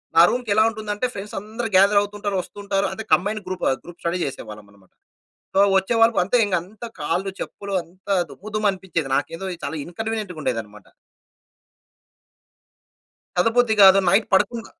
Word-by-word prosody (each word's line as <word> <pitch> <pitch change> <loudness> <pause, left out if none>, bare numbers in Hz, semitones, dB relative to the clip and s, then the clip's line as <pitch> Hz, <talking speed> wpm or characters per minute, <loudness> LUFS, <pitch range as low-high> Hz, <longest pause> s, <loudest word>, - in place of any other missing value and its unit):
నా 165 - +8
రూమ్‌కెలా 215 -4 +2
ఉంటుందంటే, 215 +1 -3
ఫ్రెండ్స్ 200 +1 -7
అందరూ 220 +3 -5
గ్యాదర్ 200 +2 +6
అవుతుంటారు. 205 0 -4
వస్తుంటారు 200 0 -2
అంటే 220 +4 -6
combined 205 +3 +1
group 185 -1 -3 0.2
group 175 0 -13
study 170 +2 -1
చేసేవాళ్ళమన్నమాట. 105 -7 -10 0.6
So - - +4 0.2
వచ్చేవాళ్ళు 225 +3 +3
అంతే 200 +7 +1
ఇంక 200 -2 0
అంతా 210 +6 -10
కాళ్ళు 170 +6 -1
చెప్పులు 200 -1 -6
అంతా 185 +4 -4 0.2
దుమ్ము 210 - -10
దుమ్ము 215 -1 +2
అనిపించేది. 175 -6 -4
నాకేందో 180 +4 -4 0.2
చాలా - - -4
ఇన్కన్వీనియంట్‌గా 210 -1 -5
ఉండేదన్నమాట. 105 -5 -4 2.5
చదవబుద్ధి 225 +4 +3
గాదు. 195 0 +8
నైట్ 200 +4 +3
పడుకున్న 230 +4 +2
195 Hz, 135 wpm, -22 LUFS, 175-215 Hz, 2.5 s, నా